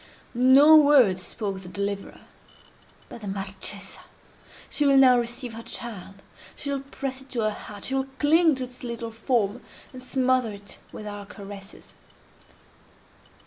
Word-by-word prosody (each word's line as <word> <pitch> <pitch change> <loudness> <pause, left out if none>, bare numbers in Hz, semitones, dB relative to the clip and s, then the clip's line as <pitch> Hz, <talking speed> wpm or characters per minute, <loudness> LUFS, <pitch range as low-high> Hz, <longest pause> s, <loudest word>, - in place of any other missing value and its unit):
No 265 +5 +7
word 275 -11 +5
spoke 195 0 -5
the 180 - -10
deliverer. 200 +1 -4 0.9
But 235 - -11
the 205 - -7
Marchesa! 195 +1 -5 0.7
She 295 - -2
will 275 -1 +5
now 255 -2 +7
receive 240 0 -4
her 225 - -7
child—she 225 +4 -7
will 280 - -1
press 270 -1 -5
it 265 - -17
to 240 - -1
her 215 0 +1
heart—she 210 +4 -6
will 270 0 0
cling 320 +2 +4
to 260 - -4
its 250 0 -10
little 235 -1 -5
form, 225 -1 -1 0.3
and 255 - -9
smother 255 -2 +1
it 200 0 -11
with 215 - -9
her 205 -1 -7
caresses. 200 -1 -11
235 Hz, 145 wpm, -25 LUFS, 205-265 Hz, 0.9 s, No